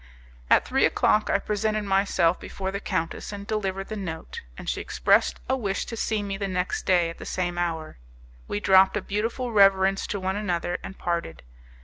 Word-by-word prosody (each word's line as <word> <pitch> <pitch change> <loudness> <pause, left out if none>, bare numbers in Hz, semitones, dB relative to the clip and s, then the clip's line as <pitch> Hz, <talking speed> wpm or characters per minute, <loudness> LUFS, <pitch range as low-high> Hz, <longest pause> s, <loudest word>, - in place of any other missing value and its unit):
At - - +5
three - - +1
o'clock 215 - +3
I - - +4
presented 215 0 -1
myself 195 -3 +2
before 190 -1 -5
the 200 - -3
countess 165 -2 -3
and 200 -1 -7
delivered 195 -3 -2
the 215 - -4
note, 170 -6 -6 0.2
and - - -9
she - - -1
expressed - - +2
a 260 - +2
wish 205 -6 -2
to 230 - -6
see 220 -1 -1
me 195 -1 -3
the 200 0 -2
next 180 -1 -2
day 175 -3 +3
at - - -13
the - - -7
same 175 -1 -2
hour. 160 - -3 0.5
We 105 - -2
dropped 190 - +5
a - - -2
beautiful 230 +4 -2
reverence 195 -2 +4
to 205 - -3
one 190 +1 -2
another, 175 -4 -2
and 190 - -8
parted. 170 - -3
195 Hz, 195 wpm, -26 LUFS, 175-210 Hz, 0.5 s, At